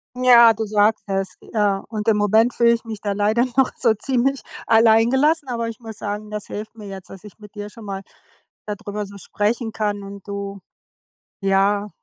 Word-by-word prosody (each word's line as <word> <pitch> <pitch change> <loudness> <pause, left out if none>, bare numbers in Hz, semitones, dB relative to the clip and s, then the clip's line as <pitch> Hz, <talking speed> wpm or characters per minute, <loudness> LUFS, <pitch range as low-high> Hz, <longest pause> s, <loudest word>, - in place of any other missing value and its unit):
Ja, 240 -2 +7
du 220 +1 -3
sagst 210 +1 +2
es, 195 -1 -3 0.2
äh, 205 -2 +2
und 215 0 -5
im 215 -2 +4
Moment 220 +4 +3
fühle 235 0 +4
ich 230 - -3
mich 220 -3 -7
da 205 - -2
leider 210 +4 +2
noch 265 -1 +4
so 230 -3 +3
ziemlich 265 +4 0 0.2
alleingelassen, 240 +7 +4
aber 235 -2 -2
ich 230 - -9
muss 225 -3 -9
sagen, 210 +1 -5
das 210 -1 -5
hilft 215 +2 -7
mir 215 -2 -10
jetzt, 190 -1 -9
dass 190 0 -11
ich 210 - -13
mit 210 -1 -14
dir 205 0 -7
schon 220 0 -13
mal 195 -1 -5 0.6
da 210 - -3
drüber 210 0 -5
so 200 0 -12
sprechen 220 +4 -2
kann 205 -2 -2
und 200 0 -10
du 200 -1 -5 0.8
ja, 200 +1 +2
210 Hz, 195 wpm, -21 LUFS, 205-230 Hz, 0.8 s, Ja